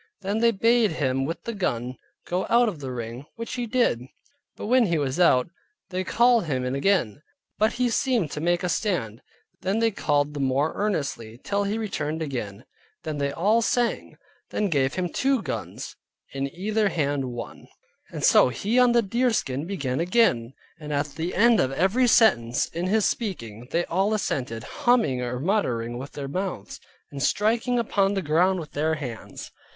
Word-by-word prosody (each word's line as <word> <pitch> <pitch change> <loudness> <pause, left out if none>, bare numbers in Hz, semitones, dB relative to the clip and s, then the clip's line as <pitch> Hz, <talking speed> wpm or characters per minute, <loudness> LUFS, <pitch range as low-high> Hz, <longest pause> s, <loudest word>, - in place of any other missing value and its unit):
Then 200 +3 -1
they 235 0 +5
bade 230 -1 +3
him 135 -3 0
with 165 +4 -5
the 235 - -4
gun 125 - -2 0.3
go 180 +2 -2
out 240 +1 +5
of 185 -8 -3
the 135 -2 -5
ring, 120 +3 -6
which 230 0 -6
he 245 -2 -3
did. 230 - +1 0.5
But - - -7
when 245 +1 +4
he 170 -2 +1
was 140 0 -2
out, 150 -5 +4 0.4
they 185 +1 -1
called 235 +2 +3
him 130 -5 -1
in 125 - -2
again; 140 - +1 0.4
but 215 +1 +3
he 250 0 +1
seemed 235 - 0
to 150 - -4
make 175 +2 +1
a - - +1
stand; 160 - -1 0.4
then 195 +3 0
they 225 0 +2
called 145 -6 0
the 145 - -5
more 135 +3 +1
earnestly, 140 - -3
till 200 0 0
he 205 +2 -1
returned 160 -7 -3
again. 120 -7 -5 0.4
Then 155 -2 -4
they 140 0 0
all 205 +10 +2
sang. 240 0 -1 0.3
Then - - -2
they 205 - +1
gave 135 -3 +1
him 185 -1 -1
two 265 +4 0
guns, 135 - -5 0.4
in 135 0 -3
either 210 +4 0
hand 145 -5 -1
one. 120 -2 -7 0.4
And - - -6
so - - +6
he 205 - 0
on 250 -1 +5
the 235 -1 +4
deerskin 200 - 0
began 140 -9 -2
again; 170 - +2 0.3
and 150 -1 -7
at 145 0 0
the 165 +5 -4
end 230 +2 +5
of 130 - +1
every 195 - +2
sentence 125 - +4
in 175 +2 -4
his 215 +2 +2
speaking, 120 - -3
they 170 +1 0
all 195 +5 +1
assented, 125 - -3
humming 225 - +1
or 125 0 -3
muttering 125 - -1
with 135 +2 -8
their 140 -2 -5
mouths, 180 - -4 0.3
and 140 - -6
striking 230 - +1
upon 205 -4 +1
the 195 - -1
ground 175 +5 +2
with 155 - -8
their 155 +2 0
hands. 125 -7 -7
170 Hz, 185 wpm, -25 LUFS, 135-215 Hz, 0.5 s, so